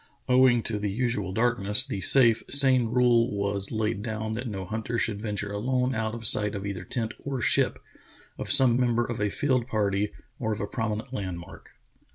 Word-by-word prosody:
Owing 125 Hz, -2 st, +4 dB
to 110 Hz, -2 st, -3 dB
the 105 Hz, 0 st, -2 dB
usual 105 Hz, -3 st, -2 dB
darkness, 110 Hz, +1 st, +2 dB
the 115 Hz, -9 st, -5 dB
safe, 115 Hz, 0 st, +4 dB
sane 130 Hz, -3 st, +5 dB
rule 120 Hz, 0 st, +3 dB
was 100 Hz, -1 st, 0 dB
laid 110 Hz, -2 st, -2 dB
down 110 Hz, -1 st, -4 dB
that 120 Hz, +3 st, -4 dB
no 95 Hz, -4 st, -5 dB
hunter 110 Hz, +4 st, -4 dB
should 105 Hz, -2 st, -2 dB
venture 105 Hz, -2 st, -4 dB
alone 125 Hz, +5 st, -1 dB
out 110 Hz, -1 st, -3 dB
of 115 Hz, -1 st, -8 dB
sight 105 Hz, 0 st, +3 dB
of 100 Hz, 0 st, -5 dB
either 95 Hz, -3 st, -5 dB
tent 110 Hz, +4 st, -4 dB
or 135 Hz, -2 st, -4 dB
ship, -, -, +1 dB, 0.6 s
of -, -, -7 dB
some 130 Hz, -4 st, +6 dB
member 120 Hz, -1 st, +1 dB
of 120 Hz, -3 st, -5 dB
a 105 Hz, -, +1 dB
field 130 Hz, 0 st, 0 dB
party, 105 Hz, -3 st, -1 dB, 0.3 s
or 110 Hz, -2 st, -1 dB
of 105 Hz, -, -6 dB
a -, -, -2 dB
prominent 110 Hz, +3 st, -4 dB
landmark. 90 Hz, -6 st, -7 dB
110 Hz, 190 wpm, -26 LUFS, 105-125 Hz, 0.6 s, some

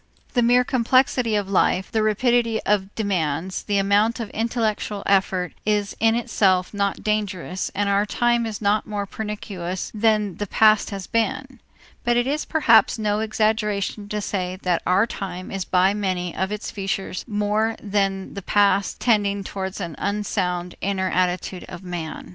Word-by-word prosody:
The 245 Hz, -, +3 dB
mere 245 Hz, +1 st, +4 dB
complexity 250 Hz, -2 st, +2 dB
of 205 Hz, -1 st, 0 dB
the 195 Hz, -, -9 dB
life, 190 Hz, 0 st, +2 dB
the 220 Hz, -, +1 dB
rapidity 230 Hz, +1 st, +2 dB
of 210 Hz, -1 st, +3 dB
the -, -, -19 dB
demands, 185 Hz, -4 st, -1 dB
the 205 Hz, -1 st, -1 dB
amount 205 Hz, +4 st, +2 dB
of 225 Hz, -3 st, -5 dB
intellectual 220 Hz, -3 st, -1 dB
effort 190 Hz, -2 st, +1 dB
is 205 Hz, -2 st, 0 dB
in 225 Hz, +1 st, +3 dB
itself 195 Hz, -6 st, +1 dB
not 200 Hz, -1 st, -1 dB
dangerous 200 Hz, -4 st, -2 dB
and 205 Hz, +1 st, 0 dB
our 200 Hz, +1 st, +2 dB
time 240 Hz, +1 st, +1 dB
is 215 Hz, -1 st, -6 dB
not 205 Hz, +1 st, +2 dB
more 205 Hz, -1 st, -3 dB
pernicious 195 Hz, -4 st, -5 dB
than 210 Hz, -4 st, +1 dB
the 205 Hz, -, -3 dB
past 215 Hz, +1 st, +4 dB
has 195 Hz, -2 st, -5 dB
been; 255 Hz, +4 st, -2 dB, 0.4 s
but 240 Hz, 0 st, +2 dB
it 240 Hz, -, +2 dB
is 290 Hz, +3 st, -1 dB
perhaps 235 Hz, -11 st, +4 dB
no 210 Hz, -1 st, 0 dB
exaggeration 215 Hz, -2 st, -1 dB
to 210 Hz, 0 st, -2 dB
say 185 Hz, -2 st, -3 dB
that 180 Hz, -2 st, +1 dB
our 185 Hz, +4 st, +4 dB
time 185 Hz, -5 st, -6 dB
is 195 Hz, -2 st, -3 dB
by 185 Hz, +2 st, +3 dB
many 185 Hz, -4 st, -2 dB
of 190 Hz, +1 st, -1 dB
its 210 Hz, 0 st, -4 dB
features 195 Hz, -2 st, -3 dB
more 210 Hz, +1 st, 0 dB
than 195 Hz, -2 st, -1 dB
the 200 Hz, -, -6 dB
past 200 Hz, 0 st, +2 dB
tending 205 Hz, -4 st, +1 dB
towards 190 Hz, 0 st, -5 dB
an 170 Hz, -4 st, -4 dB
unsound 180 Hz, -4 st, -2 dB
inner 190 Hz, -1 st, -1 dB
attitude 180 Hz, 0 st, -1 dB
of 180 Hz, +1 st, -9 dB
man. 175 Hz, -3 st, -6 dB
205 Hz, 165 wpm, -23 LUFS, 190-220 Hz, 0.4 s, mere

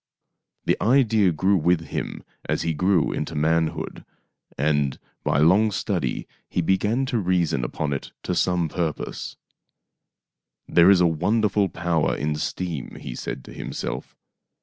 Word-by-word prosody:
The -, -, +1 dB
idea 110 Hz, -5 st, +4 dB
grew 95 Hz, +5 st, +2 dB
with 85 Hz, 0 st, +2 dB
him -, -, -4 dB, 0.3 s
as -, -, 0 dB
he 85 Hz, -1 st, 0 dB
grew 90 Hz, +2 st, +2 dB
into 80 Hz, +1 st, -3 dB
manhood, 80 Hz, +1 st, 0 dB, 0.5 s
and 75 Hz, -1 st, +1 dB, 0.3 s
by -, -, +1 dB
long 95 Hz, +9 st, +5 dB
study 100 Hz, -, -2 dB, 0.2 s
he 90 Hz, -, 0 dB
began 105 Hz, +9 st, +1 dB
to 120 Hz, -3 st, 0 dB
reason 90 Hz, -8 st, +1 dB
upon 70 Hz, +4 st, -2 dB
it 70 Hz, -, -5 dB
to 90 Hz, -, -1 dB
some 90 Hz, -1 st, +1 dB
purpose. 80 Hz, -1 st, -4 dB, 0.6 s
" -, -, -61 dB
There 85 Hz, +2 st, +6 dB
is 95 Hz, -2 st, +6 dB
a -, -, +5 dB
wonderful 100 Hz, +4 st, +2 dB
power 85 Hz, -2 st, 0 dB
in 75 Hz, +1 st, -1 dB
steam," 80 Hz, -3 st, -4 dB
he 60 Hz, -, -6 dB
said 60 Hz, -, -5 dB
to -, -, -11 dB
himself. -, -, -5 dB
85 Hz, 145 wpm, -24 LUFS, 75-95 Hz, 0.6 s, There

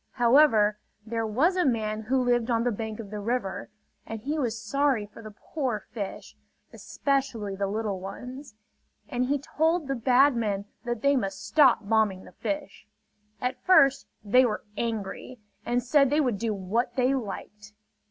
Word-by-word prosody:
However, 235 Hz, -4 st, +4 dB, 0.3 s
there 225 Hz, 0 st, -2 dB
was 290 Hz, -, +2 dB
a 365 Hz, -, +2 dB
man 220 Hz, -5 st, 0 dB
who 255 Hz, +4 st, +1 dB
lived 240 Hz, -1 st, +1 dB
on 230 Hz, -1 st, +2 dB
the 245 Hz, -, +1 dB
bank 220 Hz, 0 st, -5 dB
of 210 Hz, -3 st, -8 dB
the 210 Hz, -, -4 dB
river; 210 Hz, -2 st, -3 dB, 0.3 s
and 225 Hz, 0 st, -6 dB
he 295 Hz, +8 st, -3 dB
was 235 Hz, -4 st, -1 dB
sorry 260 Hz, 0 st, 0 dB
for 210 Hz, +2 st, -14 dB
the 215 Hz, -, -9 dB
poor 230 Hz, 0 st, -4 dB
fish, 205 Hz, -4 st, -6 dB, 0.4 s
especially 260 Hz, -8 st, -2 dB
the 200 Hz, 0 st, -1 dB
little 205 Hz, -1 st, -2 dB
ones; 250 Hz, +7 st, -8 dB, 0.5 s
and 250 Hz, 0 st, -1 dB
he 285 Hz, +2 st, +1 dB
told 320 Hz, +3 st, 0 dB
the 275 Hz, -, 0 dB
bad 260 Hz, +3 st, +4 dB
men 205 Hz, -4 st, -1 dB, 0.2 s
that 240 Hz, -2 st, -3 dB
they 280 Hz, 0 st, +4 dB
must 195 Hz, -6 st, -3 dB
stop 260 Hz, -8 st, +4 dB
bombing 215 Hz, -4 st, +2 dB
the -, -, -13 dB
fish. 295 Hz, -1 st, -5 dB, 0.5 s
At 250 Hz, 0 st, -3 dB
first 275 Hz, -7 st, +5 dB, 0.2 s
they 250 Hz, +6 st, +5 dB
were 220 Hz, -4 st, -1 dB
angry 225 Hz, +2 st, -4 dB, 0.3 s
and 245 Hz, 0 st, +1 dB
said 275 Hz, +2 st, +4 dB
they 295 Hz, +2 st, +2 dB
would 250 Hz, -9 st, 0 dB
do 230 Hz, -1 st, -1 dB
what 215 Hz, +5 st, -2 dB
they 255 Hz, +1 st, +2 dB
liked. 210 Hz, -3 st, -6 dB
235 Hz, 170 wpm, -27 LUFS, 210-270 Hz, 0.5 s, first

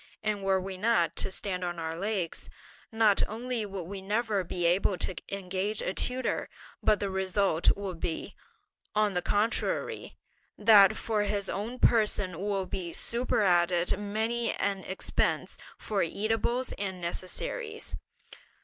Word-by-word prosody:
and 210 Hz, -2 st, -1 dB
were 190 Hz, -1 st, +3 dB
we 190 Hz, 0 st, -6 dB
not 215 Hz, -5 st, +2 dB
to -, -, +1 dB
stand 185 Hz, -1 st, -2 dB
on 175 Hz, -1 st, -2 dB
our 160 Hz, -1 st, -3 dB
legs, 190 Hz, -2 st, -2 dB, 0.4 s
not 220 Hz, -3 st, +4 dB
only 230 Hz, 0 st, -3 dB
would 195 Hz, -2 st, -5 dB
we 195 Hz, +3 st, -6 dB
never 210 Hz, 0 st, 0 dB
be 175 Hz, 0 st, -2 dB
able 180 Hz, +2 st, +3 dB
to 185 Hz, -, -1 dB
engage 195 Hz, +2 st, -2 dB
a 185 Hz, -, -1 dB
tutor, 255 Hz, +5 st, -1 dB, 0.3 s
but 210 Hz, -, +3 dB
the 200 Hz, -1 st, -2 dB
result 190 Hz, -2 st, +2 dB
will 200 Hz, -2 st, -4 dB
be, 165 Hz, -1 st, -4 dB, 0.6 s
on 210 Hz, -1 st, +3 dB
the 180 Hz, -, 0 dB
contrary, 210 Hz, +6 st, -1 dB, 0.4 s
that 205 Hz, -2 st, +7 dB
for 220 Hz, -2 st, 0 dB
his 200 Hz, -1 st, -1 dB
own 220 Hz, +6 st, -4 dB
person 210 Hz, -8 st, +2 dB
will 195 Hz, -1 st, -1 dB
be 180 Hz, -2 st, -4 dB
superadded 180 Hz, -6 st, +2 dB
many 220 Hz, +3 st, -1 dB
an 200 Hz, -1 st, 0 dB
expense 190 Hz, -, -1 dB, 0.2 s
for 205 Hz, -3 st, -1 dB
eatables 225 Hz, +7 st, 0 dB
and 190 Hz, -2 st, -3 dB
necessaries." 435 Hz, -, -2 dB
200 Hz, 140 wpm, -29 LUFS, 185-215 Hz, 0.6 s, that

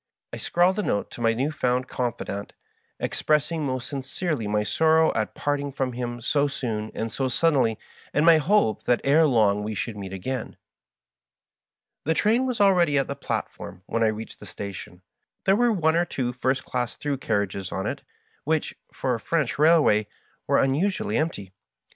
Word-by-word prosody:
I -, -, -4 dB
scrawled 180 Hz, +4 st, +2 dB
a -, -, +3 dB
note 100 Hz, -, -1 dB
to -, -, -9 dB
my 115 Hz, -1 st, +3 dB
new 135 Hz, +6 st, 0 dB
found 125 Hz, -3 st, 0 dB
confidant, 105 Hz, -4 st, -4 dB, 0.5 s
expressing 155 Hz, +1 st, 0 dB
most 130 Hz, -1 st, -3 dB
sincerely 140 Hz, -, -3 dB
my 105 Hz, 0 st, +1 dB
sorrow 160 Hz, +6 st, +3 dB
at 110 Hz, -, -2 dB
parting 145 Hz, -1 st, -1 dB
from 130 Hz, -2 st, -2 dB
him 120 Hz, 0 st, -4 dB
so 145 Hz, +4 st, +2 dB
soon 110 Hz, -6 st, -3 dB
and 115 Hz, 0 st, -3 dB
so 135 Hz, -, -1 dB
suddenly, 130 Hz, -5 st, +2 dB, 0.3 s
and 150 Hz, -, +2 dB
my 165 Hz, -2 st, +7 dB
hope 155 Hz, -, +2 dB
that 120 Hz, -, +2 dB
ere 155 Hz, +3 st, +5 dB
long 105 Hz, -6 st, +3 dB
we 105 Hz, +1 st, -4 dB
should 110 Hz, +2 st, -3 dB
meet 100 Hz, -2 st, -7 dB
again. 110 Hz, +6 st, -3 dB
in. -, -, -30 dB, 1.5 s
The 160 Hz, +2 st, +1 dB
train 230 Hz, +8 st, +2 dB
was 250 Hz, -4 st, -2 dB
already 180 Hz, -7 st, +4 dB
at 135 Hz, -, +1 dB
the -, -, -2 dB
platform 90 Hz, 0 st, -5 dB
when 115 Hz, -, -2 dB
I 115 Hz, -, +4 dB
reached 110 Hz, +1 st, -4 dB
the -, -, -11 dB
station. 95 Hz, -2 st, -8 dB, 0.4 s
There 195 Hz, -, +5 dB
were 240 Hz, +2 st, +3 dB
one 160 Hz, -6 st, +2 dB
or 170 Hz, +1 st, +3 dB
two 125 Hz, -6 st, -2 dB
first 130 Hz, +1 st, -1 dB
class 120 Hz, -2 st, -3 dB
through 145 Hz, -2 st, -2 dB
carriages 100 Hz, -6 st, -2 dB
on 95 Hz, +3 st, -3 dB
it, -, -, -3 dB, 0.4 s
which, 155 Hz, +1 st, 0 dB, 0.2 s
for 130 Hz, -, -1 dB
a 115 Hz, -, -2 dB
French 145 Hz, -2 st, -1 dB
railway, 150 Hz, -10 st, +5 dB, 0.4 s
were -, -, +3 dB
un 135 Hz, 0 st, +3 dB
usually 200 Hz, +7 st, 0 dB
empty. 100 Hz, -, -3 dB
130 Hz, 180 wpm, -25 LUFS, 110-160 Hz, 1.5 s, my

